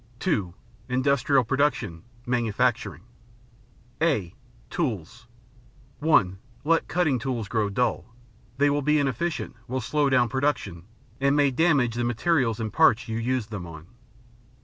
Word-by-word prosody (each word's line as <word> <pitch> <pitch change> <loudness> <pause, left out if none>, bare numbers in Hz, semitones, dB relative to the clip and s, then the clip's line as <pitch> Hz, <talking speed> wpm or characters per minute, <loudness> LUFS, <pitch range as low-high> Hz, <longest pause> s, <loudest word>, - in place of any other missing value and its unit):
(2) 90 -3 -1 0.3
Industrial 130 +1 +2
Production: 115 - 0 0.2
Manufacturing 120 0 0 1.0
(a) 135 - +1 0.4
Tools 105 +2 -3 0.7
(1) 95 - +3 0.2
Let 165 +2 +2
cutting 155 -7 +1
tools 120 -4 -3
grow 105 -1 0
dull. 105 -1 -1 0.5
They 145 +1 +3
will 145 0 0
be 150 +2 +2
inefficient, 150 +4 -2
will 130 +1 -2
slow 145 +3 +1
down 130 -2 +3
production, 115 - -2 0.3
and 140 +1 +2
may 145 -2 +3
damage 135 -4 +2
the 120 +1 -2
materials 120 -1 +1
and 110 -2 -4
parts 125 -6 +4
you 110 0 -3
use 125 0 -1
them 105 -5 -7
on. 80 -1 -10
125 Hz, 125 wpm, -25 LUFS, 110-145 Hz, 1.0 s, parts